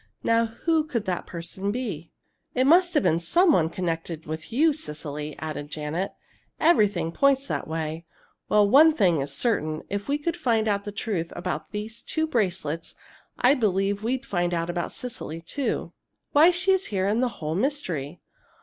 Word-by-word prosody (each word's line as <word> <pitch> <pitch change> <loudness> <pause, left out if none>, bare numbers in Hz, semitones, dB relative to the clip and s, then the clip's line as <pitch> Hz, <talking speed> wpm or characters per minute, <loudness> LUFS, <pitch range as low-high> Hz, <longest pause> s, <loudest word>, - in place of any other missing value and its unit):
Now 230 0 +3
who 315 +8 0
could 240 -8 -2
that 180 -2 -2
person 185 +4 -4
be?" 205 -10 -4 0.5
"It 255 +1 +3
must 350 +4 +5
have 295 - +4
been 165 - +3
some 340 - +3
one 160 - +3
connected 165 -2 -3
with 160 +1 -6
you, 305 +6 +4
Cecily," 150 - -5
added 155 -2 -5
Janet. 155 +5 -3 0.5
"Everything 205 - +3
points 275 +6 +3
that - - -3
way. 160 +1 -4 0.4
Well, 210 -1 +5
one 310 +8 +7
thing 175 - +3
is 140 - -4
certain: 155 -10 -1
if 200 +3 -3
we 285 - +2
could 330 +3 -2
find 230 -9 +1
out 200 -1 0
the 205 - -4
truth 195 -5 -3
about 180 - -4
these 215 +2 -6
two 315 0 -1
bracelets, 185 - -2 0.4
I 250 +3 +5
believe 200 -5 +1
we'd 255 +4 -2
find 175 -7 0
out 170 +1 -1
about 175 0 -3
Cecily, 225 -10 -6
too 250 +11 -3 0.4
why 310 +4 +7
she 370 +2 +3
is 380 0 +1
here 190 -2 -1
and 215 +4 +1
the 255 - +2
whole 155 -1 -3
mystery!" 180 - -2
200 Hz, 175 wpm, -25 LUFS, 165-265 Hz, 0.5 s, one